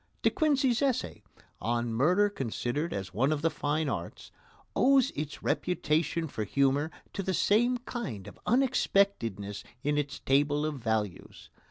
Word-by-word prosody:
De - - +4
Quincey's 275 -8 +2
essay, 255 - -1 0.4
"On 120 +2 -1
Murder 180 - +4
considered 145 - -3
as 95 -2 -4
one 130 +9 +2
of 155 -1 -1
the 165 - +3
Fine 150 +1 -1
Arts," 95 -10 -5 0.4
owes 270 0 +4
its 150 0 -6
reputation 165 -1 0
for 110 -6 -4
humour 140 +6 +1 0.2
to 200 - -2
the 190 -1 -1
same 240 +8 +3
kind 235 - -6
of 105 - -12
unexpectedness 200 - +1 0.2
in 145 +1 +1
its 145 -1 -3
table 145 +2 +2
of 150 -3 -3
values. 110 -5 -3
150 Hz, 145 wpm, -29 LUFS, -, 0.4 s, De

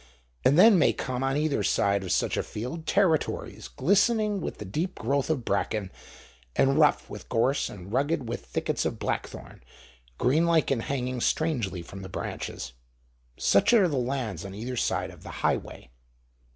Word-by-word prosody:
And 140 - +4
then 200 0 +8
may - - +4
come 130 0 -3
on 135 +1 +1
either 150 -1 0
side 100 -3 +1
of 95 - -4
such - - +1
a - - +1
field 130 +9 -6
territories 170 - 0
glistening 205 - +2
with - - -5
the 105 - -7
deep 160 - -3
growth 135 +5 -1
of 140 -7 -1
bracken, 100 0 -1 0.6
and 135 +2 +3
rough 150 -1 +3
with - - -10
gorse 130 +5 +1
and 95 +1 -10
rugged 140 -1 0
with 120 +1 -4
thickets - - -2
of - - -2
blackthorn, - - -5 0.6
green 150 +8 +2
lichen 160 -6 +2
hanging 125 0 -3
strangely 115 - 0
from 95 +3 -10
the 95 - -8
branches; 60 -7 -5 0.6
such 100 - +3
are 205 -6 +6
the 145 -5 -2
lands 120 - -2
on 100 0 -8
either 120 +5 -5
side - - -1
of - - -15
the - - -6
Highway. 60 - -2
130 Hz, 165 wpm, -27 LUFS, 105-160 Hz, 0.6 s, then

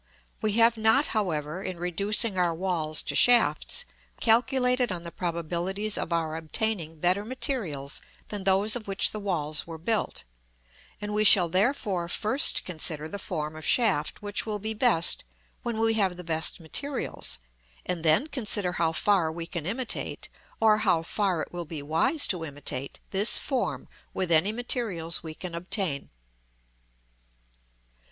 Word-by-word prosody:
We 215 -1 0
have 230 +1 +4
not, 220 +7 +4
however, 170 -5 -2
in 185 -2 -5
reducing 200 +5 +2
our 175 -2 +1
walls 160 -4 0
to - - -3
shafts, 245 - +4 0.3
calculated 250 +1 +2
on 175 -2 -4
the 170 - -8
probabilities 175 +5 -2
of - - -3
our 160 -2 -1
obtaining 165 -1 -3
better 180 +5 +1
materials 210 - -2 0.3
than 205 -2 -5
those 195 +3 +3
of 230 -4 -6
which 195 0 +3
the 215 - -6
walls 155 -7 -1
were 165 -1 -7
built; 215 +7 -2 0.8
and 210 0 -5
we 210 0 +2
shall 185 -4 +6
therefore 190 -2 0
first 215 +9 +2
consider 155 -3 0
the 200 +5 -6
form 155 -5 -4
of 155 - -9
shaft 200 -5 +1
which 205 0 -1
will 215 -1 -3
be 215 +2 -4
best 215 -7 +3 0.4
when 235 -2 -4
we 225 0 +2
have 195 -5 0
the 180 - -8
best 160 0 0
materials; 250 - -3 0.5
and 180 -2 -2
then 160 - +3
consider 215 - +1
how 165 -1 0
far 180 -2 +1
we 165 +1 -6
can 170 -2 -5
imitate, 240 +6 -2 0.3
or 215 -1 +4
how 185 -6 +1
far 185 -2 0
it - - -10
will 175 0 -5
be 155 -2 -7
wise 165 - +2
to 180 -4 -1
imitate, 140 -3 -4
this 200 +3 +5
form 260 -4 -2 0.3
with 185 -2 -2
any 165 +6 +4
materials 215 -8 -1
we 160 -1 -8
can 180 0 -7
obtain. 180 -3 -2
185 Hz, 155 wpm, -27 LUFS, 165-220 Hz, 0.8 s, shall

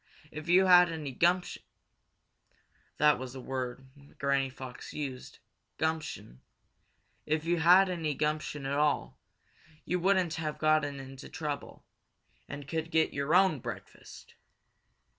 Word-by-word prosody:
If 155 +2 -8
you 185 +2 +6
had 180 -2 +7
any 155 -4 -5
gumption" 175 +7 +1 1.4
that's 130 -4 +2
the 135 - -8
word 130 0 -5 0.3
Granny 140 -1 +1
Fox 130 -1 -10
used, 135 -4 -6 0.4
gumption 155 - -3 0.9
"if 155 +1 0
you 170 0 +1
had 180 +4 +6
any 165 -5 -2
gumption 150 -1 -2
at 140 +1 -1
all, 150 -1 0 0.7
you 180 - -1
wouldn't 185 -2 +2
have 155 -2 -3
gotten 155 -2 +1
in 135 0 -10
trouble, 145 +1 -6 0.6
and 140 0 -7
could 160 +1 -3
get 160 -1 +2
your 140 +4 0
own 185 -6 +4
breakfast." 120 -1 -10
150 Hz, 125 wpm, -30 LUFS, 135-165 Hz, 1.4 s, had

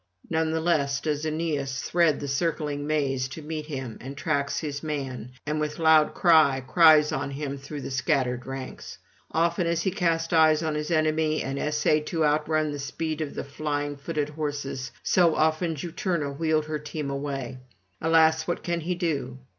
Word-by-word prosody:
None 160 -1 +1
the 160 0 0
less 145 -5 +1
does 150 0 -2
Aeneas 150 -4 -2
thread 170 -3 +2
the 145 - -4
circling 145 0 -1
maze 135 -4 0
to 140 +5 -9
meet 155 0 -5
him, 130 -6 -5
and 135 +2 -8
tracks 140 -2 -1
his 145 -2 -4
man, 130 -6 -4
and 150 +1 -1
with 150 0 -2
loud 160 -2 +4
cry 155 -6 +5
cries 150 +3 +5
on 140 +1 -2
him 140 0 -4
through 140 +1 -7
the 135 - -6
scattered 130 -1 0
ranks. 135 -1 -7 0.3
Often 170 +1 +1
as 170 0 0
he 190 - +1
cast 165 -3 0
eyes 160 -1 +5
on 155 -1 -1
his 150 +1 -3
enemy 155 -1 +1
and 135 +1 -3
essayed 150 0 +1
to 160 -2 +1
outrun 155 +1 +1
the 145 - -5
speed 155 +3 -3
of 150 - -4
the - - -3
flying 145 0 -3
footed 150 +1 -3
horses, 145 -3 -4
so 170 -3 +4
often 160 +1 +1
Juturna 160 -2 -2
wheeled 155 0 +1
her 155 0 -3
team 150 -1 -5
away. 135 -3 -4 0.4
Alas, 160 0 +4
what 175 - -2
can 170 -1 -1
he 180 +3 -2
do? 145 -7 -2
150 Hz, 180 wpm, -26 LUFS, 140-160 Hz, 0.4 s, cry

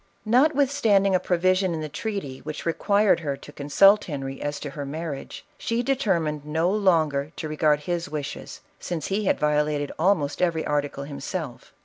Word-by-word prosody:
Notwithstanding 250 -6 +3
a 185 - +4
provision 185 0 +1
in 160 - -4
the 155 - -3
treaty 150 -6 -5
which 155 0 -7
re 165 - +1
quired 205 0 +3
her 145 -4 -3
to 145 - -12
consult 195 +9 +4
Henry 135 -3 -5
as 145 0 -3
to 145 - -5
her 145 - -5
marriage, 150 0 -6
she 230 +1 -1
determined 175 - 0
no 160 +4 0
longer 160 -8 +2
to 155 - -5
regard 150 -1 +2
his 170 0 -3
wishes, 145 -2 -6 0.2
since 165 -4 -4
he 200 +2 -1
had - - +2
violated 150 -1 +1
almost 165 -5 +1
every 170 -3 +1
article 145 -1 -1
himself. 145 0 -6
160 Hz, 165 wpm, -25 LUFS, 145-195 Hz, 0.2 s, a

